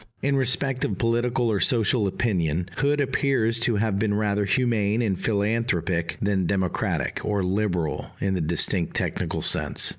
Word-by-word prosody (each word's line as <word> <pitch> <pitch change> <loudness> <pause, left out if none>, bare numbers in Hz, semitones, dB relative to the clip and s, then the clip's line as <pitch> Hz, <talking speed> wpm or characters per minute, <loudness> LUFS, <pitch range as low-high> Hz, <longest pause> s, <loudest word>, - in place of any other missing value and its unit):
In 140 +1 +2
respect 135 0 0
of 100 - -1
political 120 +2 +1
or 100 - 0
social 115 -2 +2
opinion, 90 -5 -1
Hood 145 +1 +1
appears 130 -4 +1
to 115 0 +2
have 105 -1 0
been 105 -1 +1
rather 105 -1 0
humane 110 -1 +1
and 100 -4 0
philanthropic 100 -6 0
than 100 -3 0
democratic, 95 -2 -1
or 100 -2 0
"liberal" 90 -4 -1
in 95 -1 0
the 90 - -1
distinct 85 +2 0
technical - - -2
sense. - - +1
105 Hz, 150 wpm, -24 LUFS, 95-120 Hz, -, In